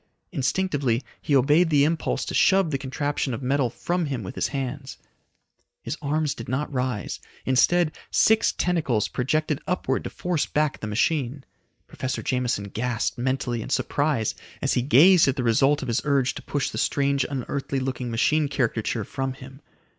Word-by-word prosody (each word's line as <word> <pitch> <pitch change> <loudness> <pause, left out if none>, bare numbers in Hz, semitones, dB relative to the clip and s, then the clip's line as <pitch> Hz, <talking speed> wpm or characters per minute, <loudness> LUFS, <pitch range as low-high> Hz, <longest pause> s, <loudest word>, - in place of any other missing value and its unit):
Instinctively 140 -4 0 0.2
he 145 - +1
obeyed 150 +6 +4
the 145 -3 +4
impulse 160 +2 0
to - - -5
shove 190 -4 +4
the 135 - -1
contraption 140 -1 -2
of 120 - -8
metal 135 -1 +1
from 175 +7 -2
him 130 -6 -3
with 90 - -6
his - - -1
hands. 135 0 -5 0.9
His - - -3
arms 150 0 0
did 115 - -9
not 140 +3 -2
rise, 125 -5 -2 0.3
instead 155 +6 +3
six 220 0 +4
tentacles 150 -11 0
projected 150 +3 -1
upward 135 -7 -1
to - - -3
force 175 -4 -1
back 150 -2 0
the 110 - -5
machine. 130 +4 0 0.4
Professor 130 - -4
Jameson 125 -6 -1
gasped 120 +3 -2
mentally 125 -2 -1
in - - -7
surprise 140 -5 0 0.3
as - - 0
he - - +2
gazed 155 +7 +6
at 135 - +2
the 130 - -2
result 135 +5 +3
of - - -5
his 115 0 0
urge 140 -3 +1
to - - -8
push 145 -3 -2
the - - -4
strange, 140 -1 +1
unearthly 140 0 -3
looking 130 -2 -3
machine 150 +6 +2
caricature 115 -4 -1
from 135 +5 -3
him. 135 +2 -13
135 Hz, 170 wpm, -25 LUFS, 125-150 Hz, 0.9 s, gazed